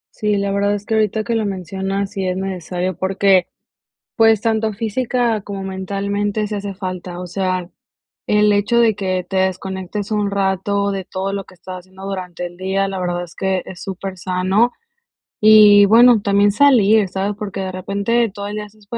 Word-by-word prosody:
Sí, 210 -1 0
la 200 0 -1
verdad 200 +1 +1
es 205 0 -7
que 225 - -3
ahorita 220 0 +1
que 235 +1 -2
lo 225 -1 0
mencionas, 195 +1 -3
sí 195 -2 -4
es 180 0 -1
necesario 185 -1 -3
porque, 190 +1 +2 0.7
pues, 225 -2 +4
tanto 220 -1 0
física 230 +1 -1
como 200 -1 -6
mentalmente, 200 +2 -2
sí 210 - -4
hace 200 -1 -4
falta, 185 -2 -6
o 180 - -6
sea, 185 -1 -2 0.6
el 210 0 +3
hecho 205 +4 +2
de 225 -3 +4
que 185 -2 -2
te 190 - -2
desconectes 190 +2 -2
un 210 -2 0
rato 200 +1 0
de 195 -2 -4
todo 190 +1 -4
lo 200 0 -3
que 190 - -18
estás 185 0 -9
haciendo 190 +1 -13
durante 180 -2 -5
el 175 0 -15
día, 190 +1 -1
la 195 -1 -4
verdad 175 -1 -2
es 175 - -12
que 190 -1 -1
es 180 - -9
super 190 -1 -6
sano. 185 +6 +1 0.7
Y 210 -1 +8
bueno, 230 +2 +6
también 200 +1 +3
salir, 220 -4 +4
¿sabes? 195 +2 -2
Porque 200 -2 -5
de 190 -1 -3
repente, 200 +5 0
todo 200 +1 -6
el 210 - -5
día 210 - -4
estás, 210 +1 -19
195 Hz, 185 wpm, -19 LUFS, 190-210 Hz, 0.7 s, Y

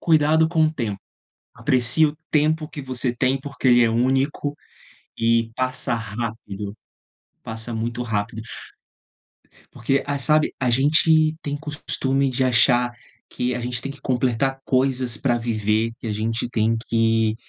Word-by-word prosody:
Cuidado 160 0 +3
com 160 -1 +2
o 155 - -1
tempo. 115 -9 -3 0.6
Aprecie 130 +5 +3
o 150 +1 -4
tempo 155 +1 +1
que 155 - -8
você 130 -1 -1
tem, 130 +2 +1
porque 140 -1 -2
ele 120 -1 +6
é 115 - +2
único 135 +4 0 0.6
e 115 0 +2
passa 130 -1 -1
rápido, 110 -2 -5 0.7
passa 115 +1 -5
muito 115 +2 -3
rápido, 110 -1 -3 1.3
porque, 135 +4 -1
eh, 145 0 -1
sabe, 155 +2 +3
a 130 -2 +1
gente 155 +4 +4
tem 145 0 -3
costume 140 -2 -1
de 130 +1 0
achar 120 0 +3 0.4
que 125 0 -2
a - - -3
gente 120 0 -3
tem 135 - -4
que 140 - -16
completar 130 +1 0
coisas 130 -3 +1
para 120 0 +1
viver, 110 -1 0
que - - -7
a 110 - -1
gente 110 +3 -2
tem 115 -1 +1
que 115 -1 +2
125 Hz, 150 wpm, -22 LUFS, 115-140 Hz, 1.3 s, ele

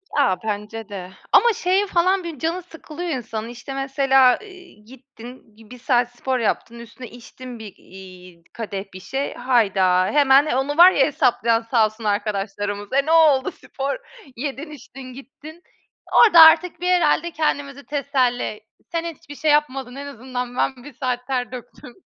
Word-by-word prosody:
A, 190 -11 +2
bence 215 +1 -5
de. 185 -2 -8 0.2
Ama 475 -1 +5
şeye 380 +2 0
falan 370 +1 +1
bir 330 -5 -7
canı 330 +5 -2
sıkılıyor 335 0 -8
insanın. 225 -6 -4
İşte, 245 +3 -9
mesela, 270 -1 +3
iii, 365 - -16
gittin 250 -2 -14
gi 225 +1 -18
bir - - -22
1 250 0 -12
saat 245 0 +1
spor 260 +1 -2
yaptın, 230 +1 -2
üstüne 235 +2 -11
içtin 245 +1 -11
bir, 210 -3 -10
iii, 185 -2 -15
kadeh 205 -3 -6
bir 185 - -9
şey. 270 +8 -4
Hayda! 195 -7 +2
Hemen 280 +1 +5
onu 285 +1 -1
var 355 +2 +9
ya 275 -7 +3
hesaplayan 235 -5 +1
sağ 230 -1 +2
olsun 215 +1 -7
arkadaşlarımız. 205 0 -3
"E, 275 +1 +2
ne 315 - -1
oldu 310 -5 +4
spor? 275 +1 -5 0.4
Yedin, 280 +4 -6
içtin, 260 -2 -11
gittin." 295 +6 -13 0.5
Orada 415 -8 +7
artık 325 +1 +6
bir 360 - -2
herhâlde 345 -2 +2
kendimizi 285 -3 -3
teselli, 255 -6 -1 0.3
"Sen 335 -1 -2
hiçbir 305 -3 -9
şey 305 +1 +1
yapmadın. 270 -4 0
En 280 +1 -7
azından 250 -1 -6
ben 255 -2 -1
1 290 - -12
saat 250 -1 -4
ter 250 -2 -2
döktüm." 250 0 -11
260 Hz, 165 wpm, -21 LUFS, 225-295 Hz, 0.5 s, var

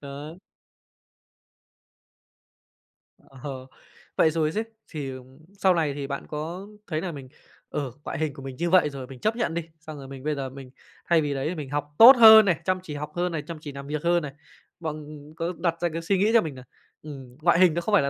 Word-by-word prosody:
Đó. 145 +2 -8 2.9
Ờ. 130 -1 -8 0.5
Vậy 160 - +4
rồi 155 -1 0
xứ, 215 +6 -1 0.2
thì, 145 -4 -5
ờm, 130 0 -12 0.2
sau 195 -2 +3
này 155 -5 0
thì 140 -1 -5
bạn 140 0 -5
có 165 +6 -6 0.2
thấy 155 -3 -2
nà 180 -1 -3
mình, 135 -4 -9 0.4
ờ, 140 -4 -3
ngoại - - -5
hình 155 -3 -1
của 140 - -11
mình 135 -1 -7
như 170 +1 -1
vậy 180 -4 +5
rồi 135 -3 -8
mình 130 -1 -11
chấp 215 - 0
nhận 235 -8 -1
đi, 170 - -1 0.2
xong 155 -1 -9
rồi 135 -1 -9
mình 135 -1 -10
bây 150 0 -1
giờ 135 -2 -4
mình 130 -1 -11 0.4
thay 170 -2 +5
vì 145 -1 -1
đấy 135 +2 -2
thì 180 - -4
mình 150 -5 -6
học 145 +1 -4
tốt 250 +4 +11
hơn 220 -2 +10
này, 180 -5 +1
chăm 185 0 +1
chỉ 150 -5 -7
học 150 +1 -5
hơn 175 +1 0
này, 160 -2 -3
chăm 170 -2 -6
chỉ 145 - -7
làm 140 0 -9
việc 150 0 -3
hơn 175 0 +3
này. 145 - -5 0.5
Bọn, 155 -2 -5
ừm, 150 0 -12
có 165 +2 -3
đặt 170 -1 -1
ra 175 - +1
cái 165 - -3
suy 190 +4 +1
nghĩ 210 +4 +3
cho 230 - +6
mình 155 -4 -5
nà, 130 - -11 0.4
ừm, 135 -5 -10
ngoại 170 +1 +4
hình 180 -3 +6
nó 170 - -1
không 210 - -3
phải 205 - +6
là 140 - 0
155 Hz, 235 wpm, -25 LUFS, 140-175 Hz, 2.9 s, tốt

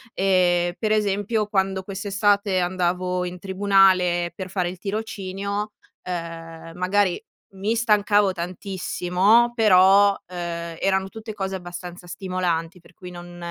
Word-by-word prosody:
Ehm, 175 -2 +2
per 215 -2 0
esempio 210 +1 +1
quando 190 -2 0
quest'estate 200 0 0
andavo 180 0 -1
in 180 0 -6
tribunale 190 -2 +3
per 185 0 -6
fare 180 -1 -1
il 180 0 -9
tirocinio, 200 0 -4 0.3
ehm, 165 -2 -7
magari 185 0 +1 0.3
mi 195 +3 -2
stancavo 210 -3 +3
tantissimo 185 +5 +1
però, 200 -2 +5
ehm, 170 -2 -5
eran 190 0 0
tutte 220 0 -8
cose 195 -2 -4
abbastanza 175 -1 -8
stimolanti, 180 -1 -3
per 175 - -21
cui 180 -1 -11
non 175 0 -10
190 Hz, 120 wpm, -23 LUFS, 175-200 Hz, 0.3 s, però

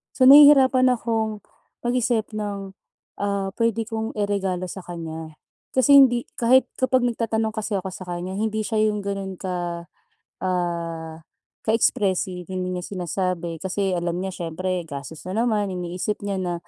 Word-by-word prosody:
So 260 - +2
nahihirapan 270 -2 +8
akong 225 -4 -1 0.4
mag-isip 240 -2 0
ng, 205 -2 -4 0.5
ah, 200 -1 -1
pwede 230 -1 +1
kong 225 0 -4
iregalo 195 -3 -1
sa - - -7
kanya 160 -2 -7 0.4
kasi 280 +2 +6
hindi 245 -3 +6 0.2
kahit 255 +2 +4
kapag 260 0 +2
nagtatanong 225 -2 0
kasi 220 0 -4
ako 190 -1 -2
sa 185 0 -9
kanya 180 +2 -5
hindi 220 0 -1
siya 215 +1 -2
yung 210 -1 -2
gano'n 195 -1 -4
ka, 175 -2 -4 0.5
ah, 170 -3 -3 0.5
ka-expressive, 190 -5 +1
hindi 185 -1 -3
niya 180 -1 -4
sinasabi 175 -2 -2
kasi 190 +2 -1
alam 175 -1 -1
niya 190 - -3
siyempre 180 0 -3
gastos 145 +3 -8
na 185 - -4
naman 215 -4 +1
iniisip 180 +3 -3
niya 200 -1 -2
na, 180 -1 -2
195 Hz, 145 wpm, -23 LUFS, 180-220 Hz, 0.5 s, nahihirapan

